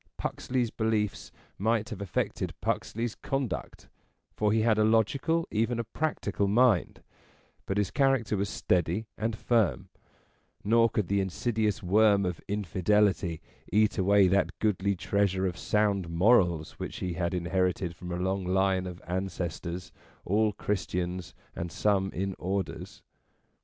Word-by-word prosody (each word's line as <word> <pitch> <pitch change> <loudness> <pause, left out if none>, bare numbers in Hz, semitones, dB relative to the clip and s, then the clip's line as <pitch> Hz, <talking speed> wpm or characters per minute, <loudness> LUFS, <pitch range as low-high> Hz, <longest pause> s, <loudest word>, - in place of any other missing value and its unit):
Puxley's 125 -3 -2
beliefs 110 -2 -1 0.3
might 110 +1 +1
have 105 -4 -6
affected 100 - -2
Puxley's 115 +1 -2
conduct, 135 -3 -4 0.5
for 105 -1 +1
he 110 +1 +3
had 110 -2 +3
a - - +5
logical, 135 +10 +2
even 115 +2 0
a 115 - -1
practical, 110 -6 -2
mind; 110 -2 +2 0.6
but 95 - -1
his 105 -2 0
character 135 -7 +2
was 100 0 -1
steady 90 +4 0
and 110 0 -2
firm; 110 - +1 0.7
nor 115 +2 +4
could 105 -4 -1
the 100 +1 +1
insidious 105 +2 -1
worm 100 +1 +4
of 90 -2 -3
Infidelity 100 -3 +1 0.3
eat 105 -1 +3
away 100 +1 +5
that 90 -1 +1
goodly 100 -2 +1
treasure 95 0 0
of 90 -2 -1
sound 100 -4 0
morals 85 -3 +2
which - - -5
he 90 -2 -3
had 85 +1 -1
inherited 90 0 0
from 90 +1 -8
a - - -1
long 95 +2 -1
line 95 0 +1
of 90 -1 -9
ancestors, 90 -1 -4 0.3
all 105 +3 +2
Christians, 90 -3 -3 0.2
and 85 0 -4
some 95 0 +1
in 95 +2 -2
Orders. 95 +2 -4
100 Hz, 135 wpm, -29 LUFS, 90-110 Hz, 0.7 s, a